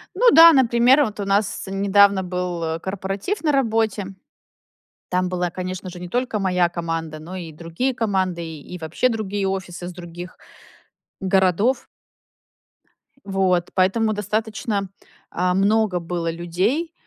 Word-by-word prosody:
Ну 480 +4 +5
да, 330 0 +9
например, 255 +2 +5
вот 210 -4 -4
у 200 - -2
нас 200 +1 0
недавно 200 0 +3
был 175 -3 -3
корпоратив 195 - -4
на 300 - +3
работе. 220 -7 0 0.9
Там 180 0 0
была, 180 -1 -2
конечно 185 +1 -5
же, 180 -1 -9
не 180 - -7
только 245 +1 -1
моя 180 -3 +2
команда, 165 -2 -4
но 170 +4 -8
и 170 -3 -7
другие 170 - -3
команды, 190 -7 -1
и 160 +1 -9
и 180 - -6
вообще 160 +10 0
другие 205 -4 -2
офисы 180 -2 -5
с 180 - -7
других 175 +1 -9 0.8
городов. 195 +6 +2 1.4
Вот 190 -3 0
поэтому 215 +4 +2
достаточно, 210 -1 -2 0.4
а, 180 +1 0
много 200 0 +2
было 170 -1 -3
людей, 190 - -1
190 Hz, 135 wpm, -22 LUFS, 175-215 Hz, 1.4 s, да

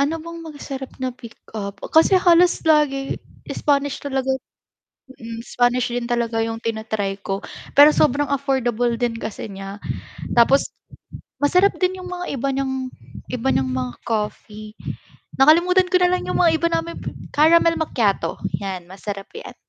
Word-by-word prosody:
Ano 295 +4 +1
bang 335 0 -7
masarap 285 -4 -7
na 260 -1 -3
pick 240 -1 -12 0.2
up. 200 -2 -5 0.2
kasi 325 +4 +6
halos 355 -1 +4
lagi 295 -4 +2 0.3
Spanish 285 -1 0
talaga 265 -1 -1 0.9
mm, 230 0 -7
Spanish 245 0 +1
din 240 -1 -2
talaga 235 -2 0
yung 225 0 -1
tina-try 220 -3 -2
ko, 195 0 -4 0.3
pero 295 +1 +9
sobrang 290 0 +2
affordable 245 -4 0
din 240 0 0
kasi 215 -1 -6
niya. 195 +1 -7 0.6
Tapos, 245 +4 +4 0.7
masarap 360 +7 +4
din 370 0 +1
yung 365 - -8
mga 360 0 -4
iba 275 +2 -1
niyang 265 -1 -2 0.4
iba 250 +1 -1
niyang 130 -1 +1
mga 125 -1 -3
coffee. 215 -1 -4 0.6
Nakalimutan 355 +6 +5
ko 365 - +3
na 360 - +4
lang 365 - -1
yung - - 0
mga 335 -2 +5
iba 335 - +2
naming 330 0 -2 0.3
"Caramel 330 +2 +5
macchiato." 225 -10 0 0.2
'Yan, 190 -3 -5
masarap 195 0 -6
'yan. 460 - -9
265 Hz, 145 wpm, -21 LUFS, 225-315 Hz, 0.9 s, pero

